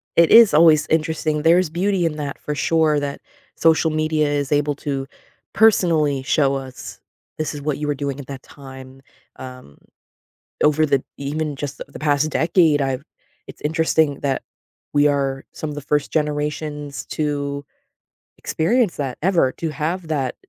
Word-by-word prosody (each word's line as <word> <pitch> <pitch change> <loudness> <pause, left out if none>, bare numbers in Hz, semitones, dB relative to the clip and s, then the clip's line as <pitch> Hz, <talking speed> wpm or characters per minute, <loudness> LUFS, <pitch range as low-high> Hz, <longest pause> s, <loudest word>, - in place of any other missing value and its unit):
it 170 -1 +5
is 230 -2 +8
always 155 -1 +5
interesting, 155 -1 0
there's 170 +1 +4
beauty 180 +2 0
in 155 -2 -2
that, 145 -2 -5
for 150 - -4
sure, 155 0 +2
that 140 -1 -5 0.3
social 160 0 +3
media 155 -1 0
is 145 -2 -2
able 145 0 +1
to 135 -1 -4 0.5
personally 160 -10 +3
show 140 -1 +2
us, 130 -1 -8 0.4
"This 155 0 -3
is 145 - -7
what 145 -1 -2
you 150 0 -4
were 145 - 0
doing 140 0 -4
at 135 - -9
that 135 -1 -8
time," 135 -1 -12 0.3
um, 125 - -11 0.9
over 150 +1 +3
the 140 -3 +1
even 145 +1 -3
just 145 -1 -6
the - - -6
the 140 - -11
past 150 0 +1
decade, 160 -3 +3
I've 135 +1 -2 0.4
it's - - -12
interesting 160 -2 +1
that 135 -2 -1 0.5
we 145 0 +4
are 135 -2 0
some 155 - -5
of 145 - -6
the 145 - -4
first 145 +1 -1
generations 150 -1 -3
to 145 -2 -3 0.7
experience 220 +4 0
that, 135 -4 -3
ever, 170 -6 +2
to 165 - -4
have 165 +3 -3
that 135 -5 -1
150 Hz, 160 wpm, -21 LUFS, 140-160 Hz, 0.9 s, is